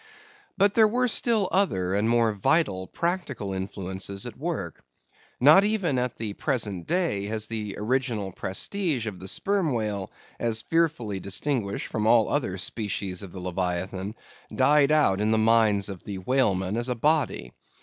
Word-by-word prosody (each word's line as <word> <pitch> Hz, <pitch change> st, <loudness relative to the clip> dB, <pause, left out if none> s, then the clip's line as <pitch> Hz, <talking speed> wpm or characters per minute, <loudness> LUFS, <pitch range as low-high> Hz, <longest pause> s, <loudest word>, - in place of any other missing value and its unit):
But 200 Hz, 0 st, +4 dB
there 220 Hz, -1 st, +6 dB
were 250 Hz, +3 st, +1 dB
still 225 Hz, -3 st, +2 dB
other 95 Hz, -, +1 dB
and 105 Hz, +3 st, +1 dB
more 115 Hz, -2 st, +3 dB
vital 100 Hz, -, +1 dB
practical 160 Hz, -, -3 dB
influences 95 Hz, 0 st, -5 dB
at -, -, -6 dB
work. -, -, -4 dB, 0.6 s
Not 150 Hz, +9 st, +7 dB
even 195 Hz, -11 st, +1 dB
at 125 Hz, -1 st, -2 dB
the 110 Hz, -3 st, -4 dB
present 105 Hz, -, -2 dB
day 165 Hz, -, 0 dB
has 110 Hz, 0 st, -3 dB
the 110 Hz, -3 st, -5 dB
original 115 Hz, -3 st, -1 dB
prestige 135 Hz, -, -2 dB
of 100 Hz, -5 st, -5 dB
the 95 Hz, -, -8 dB
Sperm 190 Hz, -, 0 dB
Whale, 105 Hz, -4 st, -2 dB, 0.3 s
as 110 Hz, -1 st, 0 dB
fearfully 150 Hz, -12 st, 0 dB
distinguished 100 Hz, +2 st, -2 dB
from 110 Hz, -1 st, -2 dB
all 115 Hz, -1 st, +5 dB
other 120 Hz, -10 st, -1 dB
species 100 Hz, -2 st, -4 dB
of 100 Hz, -3 st, -8 dB
the 95 Hz, -, -8 dB
leviathan, 95 Hz, +3 st, -3 dB, 0.4 s
died 145 Hz, 0 st, +4 dB
out 125 Hz, -11 st, +3 dB
of 105 Hz, -, +1 dB
the 110 Hz, -, +3 dB
minds 110 Hz, -3 st, +3 dB
of 95 Hz, -3 st, -7 dB
the 100 Hz, -2 st, -6 dB
whalemen 95 Hz, -2 st, +1 dB
as 120 Hz, +2 st, -1 dB
a 125 Hz, -, 0 dB
body. 130 Hz, -, 0 dB
110 Hz, 160 wpm, -26 LUFS, 95-145 Hz, 0.6 s, Not